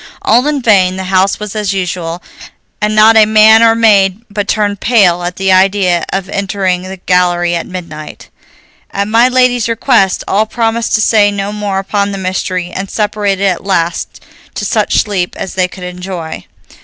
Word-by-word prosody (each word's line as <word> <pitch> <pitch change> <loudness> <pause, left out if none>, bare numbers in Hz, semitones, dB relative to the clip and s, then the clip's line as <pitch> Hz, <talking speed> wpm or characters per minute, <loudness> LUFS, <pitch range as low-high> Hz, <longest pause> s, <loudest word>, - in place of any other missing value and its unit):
All 245 +5 +2
in 290 -3 -1
vain; 190 -5 +3
the 190 - -5
house 190 +1 +2
was 210 0 -7
as 210 -2 -1
usual, 180 -2 -4 0.6
and 210 0 0
not 220 +1 +6
a 215 -1 +6
man 220 +1 +5
or 225 0 +4
maid 205 -2 +2
but 205 0 -3
turned 205 -2 -1
pale 195 -8 +2
at 175 +1 -4
the 195 0 0
idea 185 -2 +2
of 190 -1 -3
entering 195 -2 -2
the 190 +1 -8
gallery 175 -1 +1
at 170 - -3
midnight. 170 -4 -9 0.6
At 200 0 -3
my 230 +3 +3
lady's 250 -2 +1
request, 230 -4 +1
all 215 +3 +1
promised 225 0 -1
to 215 - +1
say 210 -1 +3
no 200 0 -4
more 205 -2 -3
upon 200 +1 -1
the - - -4
mystery, 185 -1 -3
and 190 +2 -5
separated 205 -2 -1
at 185 -3 -1
last 175 -3 -2 0.4
to - - -4
such - - 0
sleep 190 -4 -3
as 190 - -6
they 185 -1 0
could 185 0 -12
enjoy. 180 -2 -7
195 Hz, 180 wpm, -12 LUFS, 185-215 Hz, 0.6 s, not